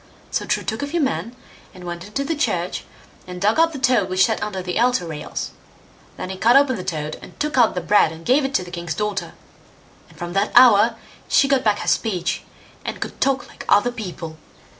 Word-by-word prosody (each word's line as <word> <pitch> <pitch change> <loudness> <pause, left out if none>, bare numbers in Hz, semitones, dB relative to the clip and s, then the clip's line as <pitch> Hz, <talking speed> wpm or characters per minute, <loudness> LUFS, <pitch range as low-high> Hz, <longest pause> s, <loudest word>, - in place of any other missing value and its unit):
So - - -2
True - - 0
took 220 +2 -3
a 285 - -2
few 340 +4 -1
men, 265 -4 -1 0.4
and 180 - -11
went 175 +1 -6
into 275 +7 -2
the 325 - -1
church, 305 0 -1 0.4
and 180 0 -7
dug 210 - +2
up 330 0 +4
the 300 - -6
toad 255 -8 +2
which 185 0 +4
sat - - -1
under 195 -3 -3
the 180 +3 -2
altar 245 -6 +2
rails. 155 -3 -5 0.7
Then 185 - -5
he 190 - -6
cut 235 +5 +4
open 275 -2 +5
the 185 - -5
toad, 155 -4 -4
and - - -14
took 300 0 -1
out 240 -6 +4
the 180 - -1
bread 175 -2 +4
and 165 0 -11
gave 275 +4 +4
it 270 0 -2
to - - +2
the 175 - -11
king's 170 -2 -4
daughter; 210 -2 -3 0.8
and - - -19
from 175 0 -5
that 200 +2 +1
hour 230 -2 +7 0.3
she 275 - +4
got 275 -1 +2
back 210 -2 +2
her - - -6
speech, 190 -7 0 0.4
and - - -5
could - - -6
talk 275 +1 +1
like - - -11
other 205 +4 +4
people. 175 -8 -7
210 Hz, 225 wpm, -21 LUFS, 180-260 Hz, 0.8 s, hour